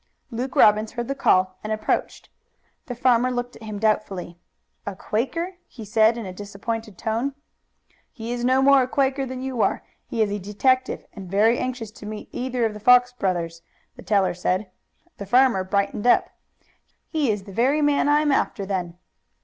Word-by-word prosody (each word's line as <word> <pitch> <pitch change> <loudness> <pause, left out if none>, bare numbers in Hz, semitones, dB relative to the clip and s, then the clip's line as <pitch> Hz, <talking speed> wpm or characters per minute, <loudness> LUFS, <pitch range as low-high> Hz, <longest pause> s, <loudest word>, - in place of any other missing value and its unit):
Luke 250 +3 -4
Robbins 215 +1 +4
heard 240 0 -4
the 275 - -1
call 185 -8 +2
and 215 - -4
approached. 215 0 -2 0.6
The 245 - -5
farmer 245 0 +3
looked 245 -1 -3
at - - -20
him 215 -2 -6
doubtfully. 200 -5 -1 0.4
"A 200 - -5
Quaker?" 330 - -3
he 225 -4 -10
said 220 +2 +3
in 230 - -5
a 185 - -6
disappointed 205 +2 -6
tone. 235 +5 -2 0.8
"He 230 +1 -7
is 240 0 -4
no 260 +2 +3
more 275 0 +6
a 250 - 0
Quaker 270 0 0
than 255 0 -6
you 260 -3 -2
are. - - +1 0.2
He 225 - +1
is 205 - -2
a 205 - -2
detective, 255 +7 0
and 190 -4 -9
very 215 +5 +3
anxious 245 -4 -4
to 210 -1 -11
meet 215 0 -7
either 250 -1 -1
of 220 - -1
the 210 - -8
Fox 250 +2 +5
brothers." 175 -7 -2 0.3
The 190 -1 0 0.6
farmer 245 -4 +4
brightened 200 +3 -1
up. - - +4 0.8
"He's 240 - 0
the 245 +10 +1
man 290 0 +2
I'm 295 0 +3
after, 205 -6 0
then." 180 -3 -3
225 Hz, 165 wpm, -23 LUFS, 200-255 Hz, 0.8 s, more